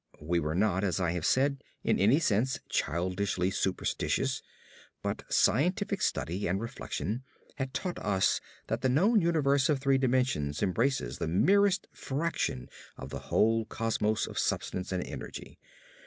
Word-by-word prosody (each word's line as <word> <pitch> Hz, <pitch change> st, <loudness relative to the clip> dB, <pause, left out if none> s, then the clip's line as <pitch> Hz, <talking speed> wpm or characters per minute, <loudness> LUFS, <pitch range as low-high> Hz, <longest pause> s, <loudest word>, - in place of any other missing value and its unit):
We 85 Hz, +3 st, 0 dB
were 75 Hz, 0 st, -2 dB
not, 95 Hz, 0 st, +2 dB
as 95 Hz, -2 st, 0 dB
I 90 Hz, -3 st, +1 dB
have 85 Hz, -2 st, -1 dB
said, 140 Hz, +1 st, +2 dB, 0.2 s
in -, -, +2 dB
any 110 Hz, +8 st, +5 dB
sense 130 Hz, -3 st, +1 dB
childishly 90 Hz, +2 st, 0 dB
superstitious, 95 Hz, -1 st, -1 dB, 0.6 s
but -, -, -2 dB
scientific 185 Hz, -, +2 dB
study 90 Hz, +5 st, -1 dB
and 95 Hz, +3 st, 0 dB
reflection 115 Hz, +1 st, -4 dB, 0.3 s
had 135 Hz, -2 st, -3 dB
taught 180 Hz, -2 st, -3 dB
us 95 Hz, -2 st, +1 dB, 0.2 s
that -, -, -2 dB
the 130 Hz, -, +2 dB
known 200 Hz, -, +4 dB
universe 140 Hz, -5 st, +2 dB
of 150 Hz, -, +3 dB
three 135 Hz, 0 st, +2 dB
dimensions 125 Hz, -, +1 dB
embraces 105 Hz, -, 0 dB
the -, -, -1 dB
merest 195 Hz, -, +3 dB
fraction 135 Hz, -, -2 dB, 0.3 s
of -, -, -8 dB
the -, -, -4 dB
whole 115 Hz, +1 st, +3 dB
cosmos 110 Hz, -1 st, 0 dB
of -, -, -5 dB
substance 90 Hz, 0 st, -2 dB
and 90 Hz, -1 st, -1 dB
energy. -, -, -8 dB
115 Hz, 145 wpm, -30 LUFS, 95-140 Hz, 0.6 s, any